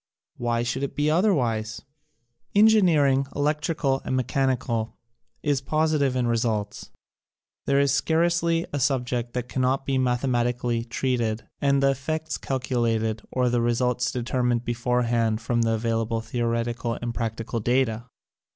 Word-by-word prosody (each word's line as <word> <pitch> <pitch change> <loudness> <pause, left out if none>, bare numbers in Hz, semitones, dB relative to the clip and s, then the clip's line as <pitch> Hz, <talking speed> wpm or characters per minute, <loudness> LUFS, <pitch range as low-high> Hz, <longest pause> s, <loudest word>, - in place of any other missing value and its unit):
Why 120 -1 0
should 125 +2 -2
it 140 - -3
be 150 +1 +1
otherwise? 125 - +1 0.7
Engineering, 170 -11 +4
electrical 150 -1 0
and - - -2
mechanical, 130 -3 -1 0.5
is 145 -3 +1
positive 155 -2 +1
in 125 -1 +1
results. 110 -3 -1 0.8
There 140 0 +3
is 140 -1 +3
scarcely 170 0 +1
a 145 - -1
subject 125 -3 -1
that 125 -1 -3
cannot 130 +2 0
be 135 -1 0
mathe 125 -1 +1
matically 120 -1 0
treated 115 -3 -1
and 140 -1 +2
the 135 - +5
effects 155 +4 -3
calculated 115 -4 -1
or 125 -1 +1
the 120 -1 +1
results 120 +1 +1
determined 120 -1 -1
beforehand 120 -2 0
from 120 -1 0
the 115 -1 +2
available 115 0 -1
theoretical 115 0 -2
and 120 -1 -4
practical 115 0 -3
data. 120 0 0
125 Hz, 130 wpm, -25 LUFS, 115-140 Hz, 0.8 s, the